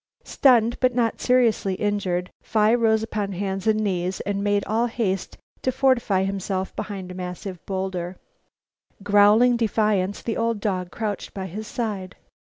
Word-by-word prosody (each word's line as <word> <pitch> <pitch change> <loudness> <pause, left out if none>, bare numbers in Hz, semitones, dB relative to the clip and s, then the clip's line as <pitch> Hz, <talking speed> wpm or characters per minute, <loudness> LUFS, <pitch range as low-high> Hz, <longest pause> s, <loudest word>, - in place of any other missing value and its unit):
Stunned, 240 -3 +3
but 255 -2 +2
not 230 -2 0
seriously 235 -6 +2
injured, 190 -3 -1
Phi 215 0 +2
rose 220 -2 +3
upon 210 -3 -3
hands 195 +1 -3
and 215 0 +3
knees 185 -2 -1
and 200 0 -2
made 205 -1 +1
all 230 +3 +1
haste 205 -5 -2 0.2
to 260 - +1
fortify 255 -7 +2
himself 190 -1 -3
behind 190 -3 -5
a - - -6
massive 180 0 -6
bowlder. 190 -2 -3 0.9
Growling 210 +4 +5
defiance, 210 -4 0
the 230 - -2
old 230 -1 0
dog 185 -4 -2
crouched 210 0 -4
by 190 -1 -4
his 210 +4 -6
side. 205 -6 -4
205 Hz, 150 wpm, -24 LUFS, 190-225 Hz, 0.9 s, Growling